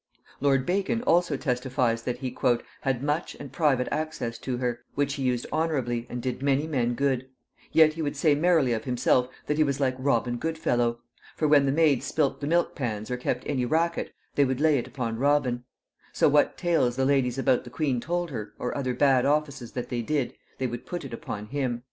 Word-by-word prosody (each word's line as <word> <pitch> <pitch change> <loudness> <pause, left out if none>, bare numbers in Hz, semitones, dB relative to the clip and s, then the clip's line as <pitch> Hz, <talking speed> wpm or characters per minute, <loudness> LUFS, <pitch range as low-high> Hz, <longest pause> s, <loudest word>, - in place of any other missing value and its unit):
Lord 135 -2 +2
Bacon 200 +6 0
also 170 - +2
testifies 125 -3 0
that 125 +1 -3
he 130 -2 -5 0.5
"had 135 -2 -1
much 150 +3 -1
and 140 - -9
private 140 -6 +2
access 150 -7 -3
to 125 -2 -3
her, 120 -1 -2 0.2
which 140 -1 0
he 140 - -5
used 125 -2 0
honorably 130 -7 -1
and 120 0 -5
did 130 0 -3
many 140 +1 +2
men 125 -6 0
good: 130 -1 0 0.4
yet 160 -1 +6
he 165 - -5
would 145 -2 -2
say 150 +1 +4
merrily 155 -4 +3
of 110 - -3
himself, 125 0 +2 0.2
that 150 - -1
he 155 - +5
was 140 -2 -1
like 130 -2 +2
Robin 120 -2 +1
Goodfellow; 120 -6 0 0.3
for 155 - +1
when 145 -2 +5
the - - +3
maids 150 -3 +3
spilt 145 -3 0
the 145 - -2
milk 170 +2 +2
pans 110 -3 -4
or - - +1
kept 125 - -2
any 135 -4 -1
racket, 165 +6 0 0.2
they 145 - +4
would 130 -1 0
lay 150 -2 +4
it - - -5
upon 115 -4 -4
Robin: 130 -3 +1 0.5
so - - +4
what 145 0 +3
tales 165 -9 +1
the 130 0 +1
ladies 135 -2 +2
about 130 -2 +2
the 125 - -10
queen 130 -1 -1
told 175 +1 -2
her, 110 -5 -6
or 125 - -3
other 130 -3 -1
bad 135 -2 +4
offices 140 -5 -1
that 125 - -4
they 120 -2 -1
did, 140 +1 -1 0.2
they 130 - -2
would 120 -1 -5
put 175 -4 -5
it 130 - -8
upon 105 -2 -5
him." 130 -1 -2
135 Hz, 210 wpm, -27 LUFS, 125-150 Hz, 0.5 s, yet